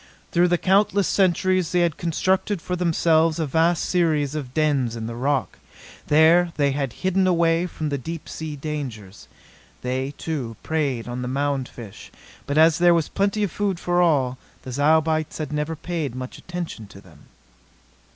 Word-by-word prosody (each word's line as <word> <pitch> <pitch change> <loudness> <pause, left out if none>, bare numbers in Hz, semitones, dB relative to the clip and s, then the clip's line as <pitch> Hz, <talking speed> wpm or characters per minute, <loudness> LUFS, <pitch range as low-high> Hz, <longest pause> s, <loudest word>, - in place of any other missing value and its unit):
Through 175 +1 +4
the 175 0 +2
countless 195 +2 +2
centuries 185 -2 +2
they 180 - +3
had 170 -3 +1
constructed 185 +3 0
for 180 +2 -3
themselves 165 -2 +2
a 160 - 0
vast 165 +3 +1
series 155 -5 +1
of 145 -5 -5
dens 140 -5 +1
in 115 -1 -5
the 115 - -5
rock. 135 +3 -1 0.5
There 165 +3 +5
they 140 -2 +2
had 135 -2 -2
hidden 190 0 +2
away 170 0 +2
from 155 -3 -4
the 140 -1 -2
deep 165 +4 -7
sea 155 -2 -6
dangers. 135 -10 -6 0.6
They, 130 +3 -2
too, 135 -8 -4
preyed 140 -7 -1
on 120 +1 -4
the 125 - -4
mound 135 0 -1
fish; 110 -5 -11 0.4
but 145 - -1
as 160 +1 +5
there 175 0 +5
was 165 -2 0
plenty 200 +1 0
of 200 - -1
food 195 -2 -1
for 175 0 +1
all, 135 -7 +2 0.2
the 130 - -7
Zyobites 155 +3 +1
had 150 -2 -4
never 150 +2 -2
paid 160 -5 -4
much 130 0 -7
attention 175 - -6
to 100 -1 -14
them. 80 -6 -19
155 Hz, 170 wpm, -23 LUFS, 135-175 Hz, 0.6 s, There